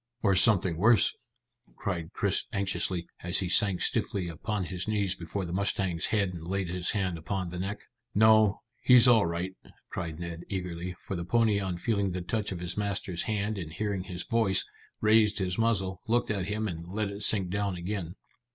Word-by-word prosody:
"Or 100 Hz, -3 st, +4 dB
something 95 Hz, -4 st, +4 dB
worse," 110 Hz, +1 st, +4 dB, 0.6 s
cried 85 Hz, -4 st, -4 dB
Chris 100 Hz, -2 st, 0 dB
anxiously, 95 Hz, -4 st, 0 dB, 0.2 s
as 90 Hz, 0 st, 0 dB
he 95 Hz, -, 0 dB
sank 95 Hz, +1 st, +4 dB
stiffly 95 Hz, -3 st, 0 dB
upon 95 Hz, +5 st, -3 dB
his 90 Hz, +1 st, -4 dB
knees 100 Hz, -4 st, 0 dB
behind 90 Hz, +1 st, -4 dB
the 85 Hz, -, -5 dB
mustang's 95 Hz, -3 st, 0 dB
head 100 Hz, -4 st, +1 dB
and 85 Hz, -2 st, -8 dB
laid 95 Hz, -1 st, -2 dB
his 90 Hz, 0 st, -2 dB
hand 95 Hz, -5 st, -1 dB
upon 95 Hz, +2 st, -3 dB
the 90 Hz, -, -5 dB
neck. 100 Hz, +3 st, -4 dB, 0.3 s
"No, 110 Hz, -1 st, +5 dB, 0.2 s
he's 125 Hz, -1 st, +7 dB
all 115 Hz, -6 st, +5 dB
right," 90 Hz, +3 st, -3 dB, 0.4 s
cried 85 Hz, -4 st, -4 dB
Ned 85 Hz, -1 st, -6 dB
eagerly, 90 Hz, -2 st, -4 dB
for 95 Hz, -, -5 dB
the 85 Hz, -, -3 dB
pony 110 Hz, +2 st, +2 dB
on 95 Hz, -3 st, -3 dB
feeling 100 Hz, -1 st, 0 dB
the 90 Hz, -, -3 dB
touch 105 Hz, +3 st, -2 dB
of 90 Hz, -2 st, -5 dB
his 90 Hz, +1 st, -2 dB
master's 100 Hz, -4 st, -2 dB
hand 105 Hz, -1 st, -2 dB
and 80 Hz, -4 st, -6 dB
hearing 100 Hz, +1 st, -3 dB
his 90 Hz, -2 st, -5 dB
voice, 110 Hz, -5 st, +2 dB, 0.4 s
raised 105 Hz, -1 st, +4 dB
his 95 Hz, -1 st, -1 dB
muzzle, 95 Hz, -5 st, +1 dB
looked 120 Hz, 0 st, +1 dB
at 100 Hz, -4 st, -1 dB
him, 110 Hz, +1 st, -2 dB
and 85 Hz, -3 st, -6 dB
let 100 Hz, +1 st, -2 dB
it 100 Hz, +1 st, -8 dB
sink 95 Hz, -5 st, +2 dB
down 100 Hz, -1 st, -1 dB
again. 90 Hz, -1 st, -4 dB
95 Hz, 190 wpm, -29 LUFS, 90-105 Hz, 0.6 s, he's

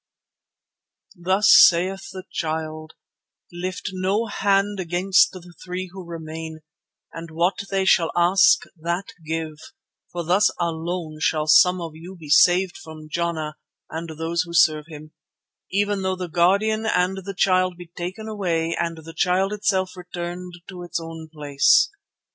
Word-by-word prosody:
"Thus 190 Hz, +4 st, +3 dB
saith 185 Hz, +7 st, +5 dB
the 185 Hz, -1 st, -8 dB
Child: 155 Hz, -1 st, -4 dB, 0.6 s
'Lift 185 Hz, +3 st, -4 dB
no 190 Hz, +4 st, 0 dB
hand 200 Hz, -1 st, 0 dB
against 185 Hz, +7 st, +3 dB
the 180 Hz, -1 st, -12 dB
three 185 Hz, 0 st, -5 dB
who 190 Hz, -1 st, -8 dB
remain, 160 Hz, -1 st, -7 dB, 0.5 s
and 165 Hz, 0 st, -8 dB
what 175 Hz, +5 st, -1 dB
they 195 Hz, -1 st, 0 dB
shall 170 Hz, -3 st, +3 dB
ask, 175 Hz, +3 st, +4 dB
that 170 Hz, +5 st, -3 dB
give, 160 Hz, -1 st, -4 dB, 0.5 s
for 175 Hz, -1 st, -4 dB
thus 185 Hz, +6 st, +3 dB
alone 165 Hz, -1 st, -3 dB
shall 155 Hz, -1 st, +1 dB
some 180 Hz, +4 st, +5 dB
of 165 Hz, -2 st, -5 dB
you 170 Hz, +4 st, -11 dB
be 155 Hz, -2 st, -11 dB
saved 175 Hz, +4 st, +4 dB
from 155 Hz, -1 st, -11 dB
Jana 160 Hz, -3 st, -2 dB, 0.3 s
and 165 Hz, +1 st, -5 dB
those 165 Hz, +1 st, -1 dB
who 170 Hz, -1 st, -6 dB
serve 155 Hz, -3 st, +4 dB
him, 155 Hz, -1 st, -11 dB, 0.6 s
even 205 Hz, +1 st, 0 dB
though 190 Hz, 0 st, -1 dB
the 180 Hz, -1 st, -5 dB
Guardian 200 Hz, +6 st, +2 dB
and 180 Hz, -1 st, +1 dB
the 195 Hz, +1 st, -6 dB
Child 185 Hz, -1 st, +2 dB
be 175 Hz, -, -10 dB
taken 185 Hz, +5 st, -6 dB
away 170 Hz, -6 st, -1 dB
and 165 Hz, -1 st, -2 dB
the 165 Hz, +1 st, -10 dB
Child 190 Hz, +3 st, +1 dB
itself 195 Hz, -3 st, -1 dB
returned 180 Hz, 0 st, -7 dB
to 180 Hz, -2 st, -9 dB
its 175 Hz, -1 st, -4 dB
own 165 Hz, -1 st, -9 dB
place. 145 Hz, -, +3 dB
175 Hz, 145 wpm, -23 LUFS, 165-190 Hz, 0.6 s, saith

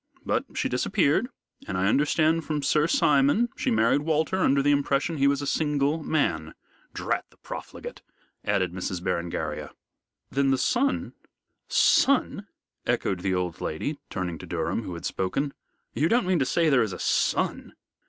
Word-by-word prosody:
But -, -, 0 dB
she -, -, 0 dB
disappeared, -, -, +1 dB, 0.4 s
and 95 Hz, -, -2 dB
I 90 Hz, -, +1 dB
understand 155 Hz, +7 st, +2 dB
from 150 Hz, -2 st, -2 dB
Sir 150 Hz, +3 st, +3 dB
Simon 145 Hz, -, +3 dB
she -, -, -1 dB
married 225 Hz, -, +3 dB
Walter 160 Hz, +4 st, 0 dB
under 140 Hz, -6 st, +3 dB
the 145 Hz, -, +4 dB
impression 145 Hz, +3 st, +1 dB
he 140 Hz, 0 st, +3 dB
was 140 Hz, 0 st, +1 dB
a -, -, -3 dB
single 150 Hz, +1 st, 0 dB
man 85 Hz, -, -1 dB, 0.4 s
drat -, -, -2 dB
the -, -, -26 dB
profligate!" -, -, -8 dB, 0.4 s
added 90 Hz, -2 st, 0 dB
Miss 95 Hz, -1 st, -3 dB
Berengaria. 85 Hz, -1 st, -3 dB, 0.6 s
"Then 135 Hz, 0 st, +2 dB
the 135 Hz, -, +3 dB
son 260 Hz, -, 0 dB, 0.3 s
" -, -, -54 dB, 0.3 s
"Son!" 255 Hz, -7 st, 0 dB, 0.4 s
echoed 95 Hz, -, 0 dB
the 95 Hz, +1 st, 0 dB
old 90 Hz, -2 st, -3 dB
lady, 140 Hz, -, -3 dB
turning 90 Hz, -3 st, -4 dB
to -, -, -9 dB
Durham, 85 Hz, +5 st, -2 dB
who 95 Hz, -5 st, -6 dB
had 85 Hz, -, -7 dB
spoken. 135 Hz, +10 st, -2 dB, 0.4 s
"You 155 Hz, +3 st, +1 dB
don't 240 Hz, -1 st, +3 dB
mean 185 Hz, -2 st, +2 dB
to 135 Hz, -, +2 dB
say 165 Hz, +3 st, +2 dB
there 135 Hz, -5 st, +4 dB
is 110 Hz, -5 st, -1 dB
a -, -, -6 dB
son?" -, -, 0 dB
140 Hz, 165 wpm, -26 LUFS, -, 0.6 s, the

